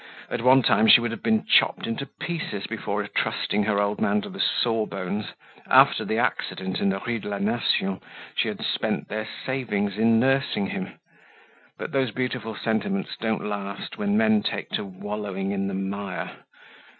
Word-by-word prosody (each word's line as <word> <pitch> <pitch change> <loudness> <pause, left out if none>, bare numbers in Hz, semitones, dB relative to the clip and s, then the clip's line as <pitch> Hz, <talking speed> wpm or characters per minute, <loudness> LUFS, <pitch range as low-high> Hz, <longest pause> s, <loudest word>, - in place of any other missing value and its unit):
At - - -1
one 130 +2 +6
time 110 - +4
she - - +9
would 120 -1 -2
have 115 - -6
been 220 -1 +2
chopped - - +4
into 115 +5 -3
pieces 160 - -4
before - - -3
trusting 105 0 0
her 100 -1 +2
old 100 +1 0
man 210 - +3
to 210 - -7
the 195 0 -9
saw 115 -2 +1
bones. 100 +3 -4 0.3
After - - +6
the - - -1
accident 95 0 -1
in 100 - +2
the 95 0 0
Rue 115 -1 -1
de 105 - -6
la 100 - -2
Nation 100 -2 0 0.3
she - - +1
had - - -4
spent - - -1
their 110 +1 -3 0.2
savings 105 -6 -1
in 115 0 +5
nursing 135 -4 +2
him. 95 - -5 0.8
But - - -5
those 135 -2 +1
beautiful 115 -2 -3
sentiments 195 - -1
don't 110 -1 -1
last 100 - -5
when 205 0 +1
men 220 -1 +4
take - - -3
to - - -1
wallowing 100 0 -4
in 100 -1 -1
the 100 - -3
mire. 100 +1 -4
110 Hz, 175 wpm, -25 LUFS, 100-130 Hz, 0.8 s, she